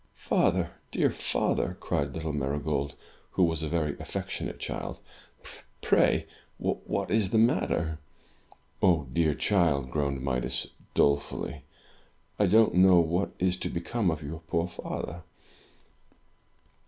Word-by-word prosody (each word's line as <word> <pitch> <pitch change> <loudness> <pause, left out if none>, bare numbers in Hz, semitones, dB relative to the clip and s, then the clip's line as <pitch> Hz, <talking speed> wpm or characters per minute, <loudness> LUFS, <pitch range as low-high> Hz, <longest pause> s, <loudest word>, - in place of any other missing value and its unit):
"Father, - - +1 0.2
dear - - +2
father!" - - -1
cried 70 0 -1
Uttle 80 -1 -3
Marygold, 70 0 -1 0.4
who 95 - +3
was 80 -2 +1
a 80 - -2
very 80 -3 0
affectionate - - -4
child, - - -4 0.9
"pray - - +3 0.3
what - - -2
is 110 -3 +2
the 110 - +2
matter?" 85 -8 +2 0.8
"Ah, 85 -5 +4
dear 80 -2 +2
child," 80 -10 +2
groaned 70 -3 -1
Midas, 65 -2 -1 0.3
dolefully, 70 0 +1 0.8
"I 105 - +4
don't 110 +4 +5
know 90 0 +7
what 85 +3 +1
is 90 0 +1
to - - -3
become 95 +4 -1
of 80 -1 -2
your 80 +3 -6
poor 85 +1 -1
father!" 85 -1 -5
80 Hz, 120 wpm, -28 LUFS, 70-90 Hz, 0.9 s, know